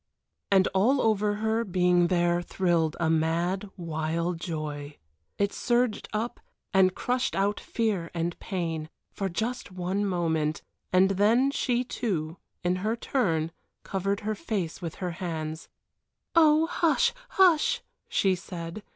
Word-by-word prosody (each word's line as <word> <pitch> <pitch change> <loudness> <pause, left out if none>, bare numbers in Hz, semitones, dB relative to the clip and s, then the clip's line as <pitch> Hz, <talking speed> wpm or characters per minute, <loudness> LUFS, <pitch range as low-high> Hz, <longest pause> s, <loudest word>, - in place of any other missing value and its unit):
And 190 -1 +5
all 235 +9 +3
over 210 -3 +2
her 220 +2 0
being 180 -3 +3
there 175 -1 +2
thrilled 170 -3 0
a 170 - +1
mad, 170 +5 +1
wild 165 0 -2
joy. 150 -4 -5 0.4
It 200 0 +1
surged 240 -2 0
up 230 +3 -2 0.3
and 185 -1 +4
crushed 250 +1 -1
out 200 +1 +1
fear 205 -8 -1
and 170 0 -1
pain 165 -4 -3 0.2
for 195 -1 -3
just 225 +6 -3
one 185 +2 -1
moment 160 -5 0 0.3
and 185 +1 +5
then 225 +8 +3
she 250 -3 0
too, 180 -10 -3 0.3
in 180 +1 +1
her 215 +5 -1
turn, 165 - 0 0.3
covered 195 +1 -1
her 215 +1 -1
face 195 -6 -3
with 165 -2 -5
her 180 -2 -3
hands. 160 -2 -5 0.6
"Oh, 315 -1 +6
hush! 350 +9 +2 0.2
hush!" 385 +7 +4 0.3
she 195 -1 +3
said. 175 +1 -6
185 Hz, 135 wpm, -27 LUFS, 170-220 Hz, 0.6 s, Oh